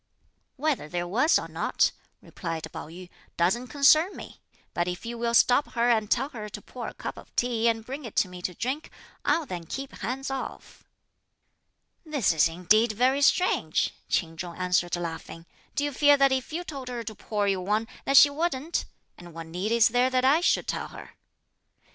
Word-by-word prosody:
"Whether 285 - -1
there 175 +1 -3
was 255 - +3
or - - -4
not," - - +1 0.3
replied 165 -3 -5
Pao - - -7
yü, 180 +3 -10 0.3
"doesn't 210 +9 +1
concern 310 +7 +4
me; - - -11 0.3
but 175 0 0
if 180 +3 -5
you 235 +1 -4
will 235 0 -1
stop 250 +4 +4
her 240 0 +3
and 220 -3 +1
tell 265 +5 +1
her 215 -7 -7
to - - -7
pour - - -8
a - - -8
cup - - -6
of - - -14
tea 235 -2 +1
and 225 -1 0
bring 275 +4 -6
it 230 - -9
to - - +3
me 180 0 -10
to 180 0 -4
drink, 265 - -3 0.3
I'll 330 - +1
then 175 -8 -6
keep 270 +7 -5
hands 260 +6 -4
off." 270 -1 -7 1.2
"This 290 - +1
is 160 0 +4
indeed 210 +7 +2
very 255 +5 +2
strange!" 280 - +2 0.2
Ch'in 165 -2 -1
Chung 175 0 -6
answered 180 -1 +1
laughing; 165 -1 -6 0.3
"do 285 - 0
you 290 - -1
fear 290 +2 +5
that 275 -1 +4
if 265 +3 -1
you 340 +3 -3
told 275 -6 -7
her 245 -2 -4
to 220 0 -6
pour 205 -1 -2
you 195 -2 +1
one, 210 +4 0 0.2
that 275 0 +4
she 285 - +9
wouldn't; 315 0 -2 0.3
and 175 -2 -12
what 165 0 -6
need 180 +6 -3
is 235 0 +5
there 245 +2 +2
that 255 0 +1
I 295 +5 +5
should - - +2
tell - - -2
her?" - - -11
235 Hz, 195 wpm, -27 LUFS, 180-275 Hz, 1.2 s, she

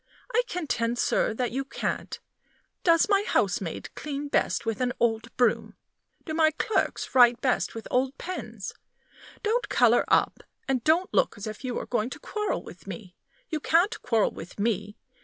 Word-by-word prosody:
I 475 - +5
contend, 240 -9 -1
sir, - - +2
that 245 0 -1
you 270 +3 -1
can't. 270 - -4 0.6
Does 335 +2 +5
my 400 -1 +3
housemaid - - -1
clean 290 -1 -5
best - - +1
with 225 +1 -2
an 245 -1 +1
old 230 0 +1
broom? 245 -3 +1 0.5
Do 315 - -4
my 315 0 +4
clerks 390 +6 -1
write 245 -2 +6
best 255 -2 0
with 225 - -6
old 260 +2 +1
pens? 370 +1 -6 0.7
Don't 465 +3 0
color - - +4
up, - - +2 0.3
and 260 -3 0
don't 335 +4 +2
look - - +2
as 205 - -6
if 215 +2 -7
you 250 -2 -3
were - - -3
going 240 -1 -1
to - - -8
quarrel 425 -1 -2
with - - -13
me! 185 -6 -8 0.3
You 315 - -2
can't 340 +7 +2
quarrel 225 -3 +2
with 170 +5 -10
me. 210 -1 -1
255 Hz, 170 wpm, -27 LUFS, 230-330 Hz, 0.7 s, write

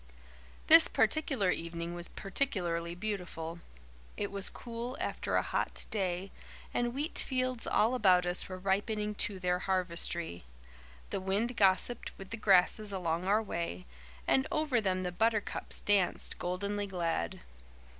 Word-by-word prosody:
This 325 +1 +9
particular 270 -11 +2
evening 170 0 -4
was 175 0 -6
particularly 175 -7 -2
beautiful. 180 -4 -4 0.6
It 205 - -2
was 200 -1 0
cool 240 +2 -6
after - - -2
a - - +3
hot - - 0
day, 190 -2 -1 0.4
and 240 0 0
wheat 295 +4 0
fields 255 -2 -1
all 225 +4 +3
about 185 -7 +4
us 175 +2 +1
were 185 - -5
ripening 210 +3 0
to 200 - -1
their 180 -1 0
harvestry. 170 - -1 0.7
The - - -2
wind 205 +6 0
gossiped 200 +4 +2
with 195 +1 -10
the 230 - -3
grasses 205 +1 +3
along 175 -2 -1
our 210 +3 +3
way, 170 - -4 0.4
and 265 - +2
over 295 -7 +1
them 185 -2 0
the 180 - -2
buttercups 220 +3 -1
danced, 200 -4 +1
goldenly 200 +3 -2
glad. 170 - -2
195 Hz, 135 wpm, -32 LUFS, 180-220 Hz, 0.7 s, This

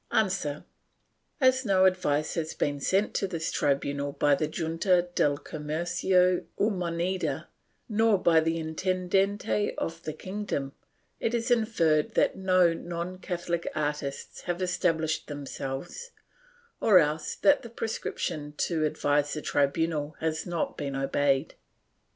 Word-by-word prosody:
A. 215 -4 +2 1.1
As 260 -1 +4
no 190 -4 +4
advice 180 -6 +1
has 160 -1 -3
been 145 -1 -1
sent 195 +8 +1
to 195 - 0
this 165 -3 -3
tribunal 140 0 0
by 145 0 +3
the 150 +2 +1
Junta 175 +3 +1
del 145 -4 +2
Comercio 175 +5 +1
y 210 - +3
Moneda, 180 +1 -2 0.4
nor 220 -1 +3
by 170 -3 +4
the 165 +1 0
Intendcnte 185 +5 0
of 165 0 -3
the 155 - -5
kingdom, 185 -7 -4 0.5
it 230 - 0
is 235 +1 -1
inferred 170 -10 +2
that - - +3
no 185 -3 +3
non 175 +2 -5
Catholic 175 -2 -3
artists 145 -2 -3
have 175 0 0
established 165 -3 0
themselves, 145 - -6 0.7
or 205 -4 +6
else 155 -1 +1
that 290 0 +4
the 235 - -9
prescription 165 -9 -4
to 165 -3 0
advise 145 -1 +1
the 155 - -3
tribunal 150 +1 0
has 160 +1 -2
not 170 -2 -2
been 140 -1 -3
obeyed. 135 +1 +1
170 Hz, 130 wpm, -28 LUFS, 150-185 Hz, 1.1 s, or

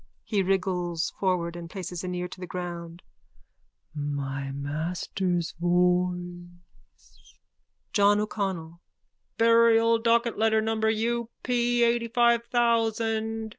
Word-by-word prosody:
(He 205 -3 0
wriggles 180 -3 -1
forward 175 -3 0
and 170 -1 -8
places 180 -2 -6
an 180 0 -3
ear 180 0 -3
to 185 - -11
the 180 - -6
ground.) 175 -1 -6 0.9
My 140 -2 -3
master's 165 +5 -2
voice! 175 - -2 0.6
JOHN 205 0 +4
O'CONNELL: 185 -6 -4 0.6
Burial 230 0 +5
docket 235 0 +1
letter 220 0 +3
number 220 0 0
U. 230 +1 -1
P. 240 -1 +1
eightyfive 235 0 +3
thousand. 225 -2 0
190 Hz, 100 wpm, -27 LUFS, 175-225 Hz, 0.9 s, Burial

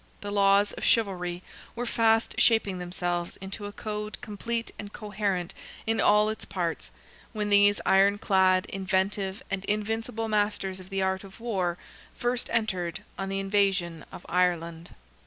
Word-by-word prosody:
The 205 - -5
laws 200 0 +4
of - - -7
chivalry 180 -5 +1 0.3
were 240 +1 -3
fast 225 -1 +2
shaping 210 -5 +4
themselves 175 -1 -3
into 200 +2 -6
a - - -7
code 210 0 -5
complete 230 +2 -4
and 205 0 -7
coherent 205 -5 -2 0.3
in 225 0 +1
all 210 0 +5
its 220 0 -3
parts, 170 -3 -3 0.4
when 210 -1 -2
these 205 0 +6
iron 195 +1 +5
clad, 185 -2 +3
inventive 190 +1 -1
and 195 -1 -2
invincible 225 +1 -2
masters 205 -3 0
of 185 0 -12
the 195 -1 -1
art 190 0 0
of 195 +1 -13
war 190 -7 -1 0.4
first 245 0 -1
entered 185 -7 -1 0.2
on 195 0 -2
the 195 0 -1
invasion 195 -4 +1
of - - -10
Ireland. 170 -2 0
195 Hz, 150 wpm, -28 LUFS, 185-210 Hz, 0.4 s, these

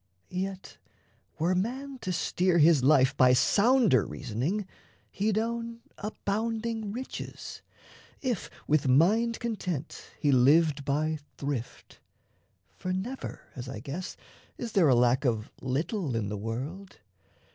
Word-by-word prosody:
Yet 190 +1 -5 0.6
were 170 +3 +2
man 260 +8 -2
to 220 -5 -3
steer 180 +1 +1
His 155 -4 +5
life 135 -1 +5
by 125 -2 +6
sounder 210 - +4
reasoning, 140 - -3 0.5
he'd 210 +1 0
own 230 +1 -2 0.2
Abounding 220 +1 -2
riches, 255 +5 -7 0.6
if 245 -8 -2 0.2
with 150 -2 +2
mind 210 - +4
content 180 - -4
He 145 - +2
lived 140 +3 +4
by 155 +2 0 0.2
thrift; 140 -4 -5 0.8
for 185 - -3
never, 215 +9 -4
as 125 0 -6
I 115 - -6
guess, 145 - -6 0.4
Is 235 -2 -5
there 180 -8 +4
a 130 - +6
lack 125 +3 +3
of 115 -4 0
little 140 - -1
in 105 -3 -1
the 105 - -3
world. 135 - -5
170 Hz, 125 wpm, -29 LUFS, 135-215 Hz, 0.8 s, by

